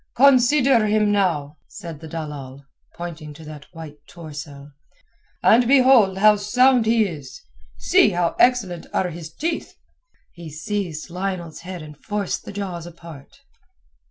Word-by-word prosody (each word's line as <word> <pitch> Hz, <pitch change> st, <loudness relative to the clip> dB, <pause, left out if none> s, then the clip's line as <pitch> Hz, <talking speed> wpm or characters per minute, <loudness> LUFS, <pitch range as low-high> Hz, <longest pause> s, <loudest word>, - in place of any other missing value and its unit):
"Consider 260 Hz, -2 st, +4 dB
him 210 Hz, 0 st, +2 dB
now," 160 Hz, -8 st, 0 dB
said 165 Hz, -4 st, -9 dB
the 160 Hz, -, -10 dB
dalal, 145 Hz, -4 st, -7 dB, 0.3 s
pointing 165 Hz, -3 st, -8 dB
to 160 Hz, -, -12 dB
that 150 Hz, -2 st, -11 dB
white 160 Hz, -3 st, -10 dB
torso. 145 Hz, -3 st, -10 dB, 0.7 s
"And 235 Hz, +1 st, +5 dB
behold 255 Hz, -7 st, +5 dB
how 210 Hz, +1 st, +5 dB
sound 245 Hz, +3 st, +3 dB
he 225 Hz, -1 st, +3 dB
is. 145 Hz, -8 st, -8 dB, 0.4 s
See -, -, +4 dB
how 175 Hz, -1 st, -1 dB
excellent 205 Hz, -9 st, +2 dB
are 180 Hz, -2 st, 0 dB
his 160 Hz, -1 st, -9 dB
teeth." 320 Hz, -, -4 dB, 0.6 s
He 170 Hz, -2 st, -10 dB
seized 165 Hz, +1 st, -5 dB
Lionel's 180 Hz, -3 st, -4 dB
head 180 Hz, -1 st, -8 dB
and 150 Hz, -1 st, -11 dB
forced 205 Hz, +5 st, -4 dB
the -, -, -7 dB
jaws 185 Hz, -4 st, -5 dB
apart. 165 Hz, -, -13 dB
175 Hz, 135 wpm, -22 LUFS, 155-215 Hz, 0.7 s, And